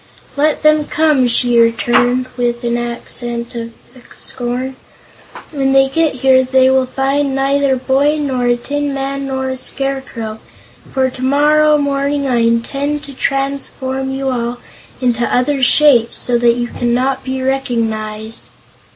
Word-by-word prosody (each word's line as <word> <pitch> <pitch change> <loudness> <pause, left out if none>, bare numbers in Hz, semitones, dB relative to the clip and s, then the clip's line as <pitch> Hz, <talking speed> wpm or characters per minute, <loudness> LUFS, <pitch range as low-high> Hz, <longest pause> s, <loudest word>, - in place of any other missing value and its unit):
"Let 300 +2 +1
them 305 -1 +4
come," 300 -5 +2
she 240 0 +2
returned, 240 +2 +2
with 240 -1 -1
an 235 0 0
accent 240 0 -3
of 230 -1 -6 0.5
scorn. 250 +2 -4 0.8
"When 270 -3 0
they 270 0 +4
get 315 0 +1
here 260 -1 +6
they 260 0 +3
will 265 -1 +2
find 270 +1 -1
neither 275 0 +1
a - - 0
boy, 280 +4 +1
nor 260 -4 -1
a 240 0 +2
tin 290 +2 -3
man, 275 0 -3
nor 265 -1 -2
a 260 - -4
scarecrow, 255 -5 -4 0.5
for 260 -1 0
tomorrow 295 +4 +3
morning 280 0 -1
I 250 -2 +1
intend 275 +6 0
to 280 -2 -10
transform 270 -1 -2
you 270 0 -2
all 240 -1 -2 0.4
into 240 -2 0
other 265 +2 +1
shapes, 255 -3 +4
so 240 -1 +1
that 235 0 +3
you 240 0 -2
cannot 255 +2 -1
be 260 0 -3
recognized." 225 -4 -2
265 Hz, 140 wpm, -16 LUFS, 240-275 Hz, 0.8 s, here